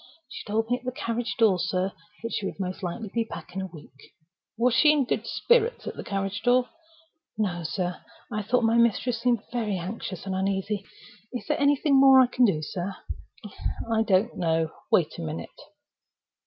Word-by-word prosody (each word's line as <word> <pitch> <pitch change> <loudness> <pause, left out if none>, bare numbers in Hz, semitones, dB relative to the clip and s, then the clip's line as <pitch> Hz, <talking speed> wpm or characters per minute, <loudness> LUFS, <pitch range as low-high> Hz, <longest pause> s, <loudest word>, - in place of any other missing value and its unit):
"She - - -7
told 220 +2 0
me 245 - +2
at - - -26
the 255 - -2
carriage 230 -3 -3
door, 210 -6 +4
sir, 185 +2 -1 0.3
that 230 - -4
she 195 - -1
would - - -7
most 185 0 -3
likely 195 +3 -4
be 230 - +1
back 225 - -9
in 190 - -3
a 190 - -4
week." 150 -6 -15 0.4
"Was 240 +1 +3
she 300 +4 +6
in 295 -3 +2
good - - -2
spirits 480 0 +2
at - - -4
the - - -6
carriage 195 +1 -3
door?" 245 +1 +3 0.7
"No, 185 -5 -1
sir. 180 +2 -3 0.3
I 210 - -1
thought 240 +4 +1
my 225 +1 +3
mistress 235 +1 +2
seemed 240 -3 +2
very 220 -5 -1
anxious 185 0 -5
and 190 - -2
uneasy. 195 +1 -1 0.5
Is 245 - -4
there 300 0 -1
anything 280 0 +4
more 270 -1 +8
I 260 - +8
can 250 0 +3
do, 155 -8 +1
sir?" 185 +4 -4 1.0
"I 220 - +3
don't 210 +2 +2
know. 165 -2 0 0.2
Wait 165 -4 +2
a - - -3
minute." 80 +1 -5
215 Hz, 190 wpm, -26 LUFS, 185-245 Hz, 1.0 s, more